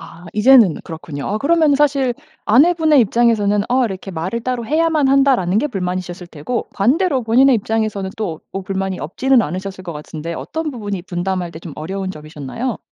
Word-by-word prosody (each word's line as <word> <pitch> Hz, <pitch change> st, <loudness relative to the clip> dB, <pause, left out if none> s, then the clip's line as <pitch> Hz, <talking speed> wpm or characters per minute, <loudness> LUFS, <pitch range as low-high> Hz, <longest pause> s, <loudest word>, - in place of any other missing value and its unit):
아 175 Hz, -, -13 dB
이제는 215 Hz, -, +6 dB
그렇군요. 160 Hz, -3 st, -7 dB
아 210 Hz, -, -1 dB
그러면은 310 Hz, +1 st, +3 dB
사실 275 Hz, -4 st, +2 dB, 0.3 s
아내분의 310 Hz, +5 st, +4 dB
입장에서는 215 Hz, -3 st, +2 dB
어 255 Hz, 0 st, +3 dB
이렇게 195 Hz, -2 st, -5 dB
'말을 185 Hz, +7 st, -3 dB
따로 245 Hz, 0 st, -3 dB
해야만 310 Hz, +1 st, +2 dB
한다.'라는게 270 Hz, -5 st, +3 dB
불만이셨을 180 Hz, -5 st, -4 dB
테고 170 Hz, +10 st, -4 dB
반대로 265 Hz, -, +2 dB
본인의 250 Hz, +4 st, +4 dB
입장에서는 215 Hz, -2 st, -2 dB
또 175 Hz, -8 st, -4 dB
뭐 195 Hz, -, -4 dB
불만이 190 Hz, -1 st, -3 dB
없지는 250 Hz, -, +2 dB
않으셨을 185 Hz, +2 st, -5 dB
것 170 Hz, -, -5 dB
같은데 155 Hz, +2 st, -7 dB
어떤 320 Hz, -, -4 dB
부분이 205 Hz, -7 st, -5 dB
분담할 180 Hz, 0 st, -3 dB
때 160 Hz, -, -8 dB
좀 165 Hz, -3 st, -9 dB
어려운 190 Hz, +4 st, -4 dB
점이셨나요? 155 Hz, -, -5 dB
205 Hz, 425 characters per minute, -18 LUFS, 180-260 Hz, 0.3 s, 이제는